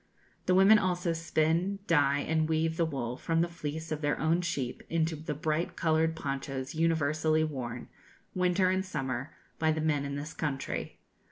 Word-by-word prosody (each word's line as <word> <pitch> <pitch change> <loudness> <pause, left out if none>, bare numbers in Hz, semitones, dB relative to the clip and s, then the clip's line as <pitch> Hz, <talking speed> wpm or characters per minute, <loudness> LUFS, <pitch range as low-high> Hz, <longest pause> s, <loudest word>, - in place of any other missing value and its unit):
The 185 - +4
women 200 +3 +7
also 180 -3 0
spin, 165 +3 +1
dye, 145 -4 +3
and 160 +1 0
weave 160 0 +1
the 165 0 +1
wool 125 -5 -3
from 165 +2 0
the 170 - +2
fleece 160 -1 -5
of 155 -1 -2
their 145 -1 0
own 165 +3 +2
sheep 135 -8 -3
into 165 0 +1
the 150 0 -5
bright 155 +3 -1
coloured 160 0 +2
ponchos 135 -2 -4
universally 155 -1 +2
worn, 125 -6 -4 0.5
winter 185 0 +2
and 185 0 +1
summer, 135 -6 -4 0.2
by 160 0 +3
the 155 - -1
men 150 -2 +1
in 140 0 -4
this 150 +3 -5
country. 140 -4 -3
160 Hz, 170 wpm, -30 LUFS, 145-165 Hz, 0.5 s, women